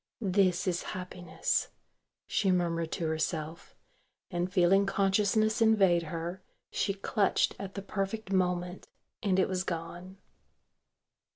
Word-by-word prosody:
"This 185 -2 +2
is 180 -1 0 0.2
happiness," 180 - -2 0.6
she 195 - +1
murmured 170 -2 0
to 170 - -2
herself, 160 +1 -3 0.6
and 175 0 -1
feeling 190 +2 +4
consciousness 205 +3 +2
invade 195 -6 +5
her, 170 +3 -5 0.3
she 195 - 0
clutched 200 0 +1
at 195 -1 -7
the 195 - -5
perfect 195 +1 -3
moment, 180 -1 0 0.3
and 190 -3 +1
it 190 - +3
was 185 -1 -1
gone. 175 +2 -6
185 Hz, 115 wpm, -30 LUFS, 175-195 Hz, 0.6 s, invade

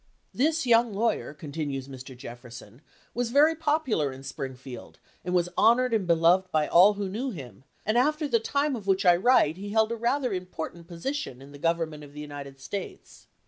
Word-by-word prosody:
This 315 +3 +1
young 230 -3 +3
lawyer 225 -5 0
[continues 145 -2 -5
Mr. 130 -1 -10
Jefferson] 120 -1 -11 0.3
was 245 -1 -1
very 295 +6 +5
popular 295 - 0
in 130 +1 -10
Springfield 130 -1 -8 0.3
and 180 +1 -2
was 175 0 +2
honored 245 +2 +4
and 205 -5 +1
beloved 175 +3 +3
by 155 -1 +2
all 185 +5 +6
who 200 -1 -3
knew 230 +8 -3
him, 135 - -9 0.2
and 215 +3 +2
after 300 +3 +1
the 235 -4 +2
time 280 +4 0
of 210 -4 -8
which 195 0 +2
I 175 -1 +7
write 180 -5 +3
he 200 +2 -6
held 220 +1 +2
a - - -1
rather 245 +1 0
important 175 -2 -6
position 175 - -4
in 135 +1 -13
the 145 - -12
government 165 -2 -1
of 145 -1 -13
the 150 - -9
United 145 -2 -8
States. 195 +9 -8
180 Hz, 185 wpm, -27 LUFS, 145-235 Hz, 0.3 s, I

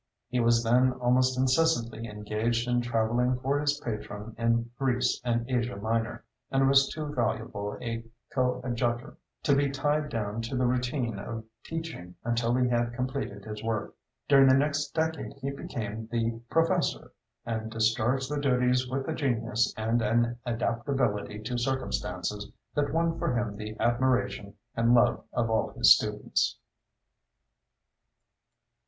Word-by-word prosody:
He 125 0 0
was 115 0 +4
then 125 +3 +4
almost 125 +1 +2
incessantly 125 -4 +1
engaged 110 +3 -1
in 120 0 +2
travelling 120 +2 +1
for 135 +3 0
his 145 0 +1
patron 105 -1 -5
in 115 0 +1
Greece 130 -2 +1
and 120 -1 0
Asia 125 -1 -1
Minor, 115 +2 -2 0.3
and 135 0 +3
was 135 0 +5
too 150 -2 -5
valuable 110 -4 -2
a 115 -1 -4 0.3
coadjutor 120 -2 -1 0.3
to 140 - +4
be 140 0 +2
tied 145 +2 0
down 110 -2 -2
to 115 +3 -4
the 125 - +2
routine 125 -3 -1
of 110 +2 -5 0.2
teaching 160 - -6
until 120 0 +1
he 125 0 +3
had 120 -1 0
completed 125 -6 -3
his 105 -1 -6
work. 115 -2 -2 0.3
During 135 -1 +7
the 130 - +7
next 145 +1 +1
decade 160 -1 -1
he 140 - -4
became 110 -5 -5
the 115 -1 -1
"professor," 165 - +1 0.3
and 110 -1 -3
discharged 115 +4 +1
the 145 -1 -1
duties 125 -2 +2
with 135 +1 -2
a 160 - -1
genius 115 -5 0
and 115 +2 +1
an 120 +1 +2
adaptability 115 -3 -1
to 120 +2 -2
circumstances 105 -6 -2 0.2
that 145 -1 0
won 165 +1 +1
for 125 - 0
him 120 -4 -2
the 110 +1 -7
admiration 120 -3 +1 0.2
and 115 +1 +4
love 120 - +3
of 115 -2 0
all 110 - +1
his - - +8
students. - - -1
120 Hz, 145 wpm, -28 LUFS, 115-130 Hz, 0.3 s, his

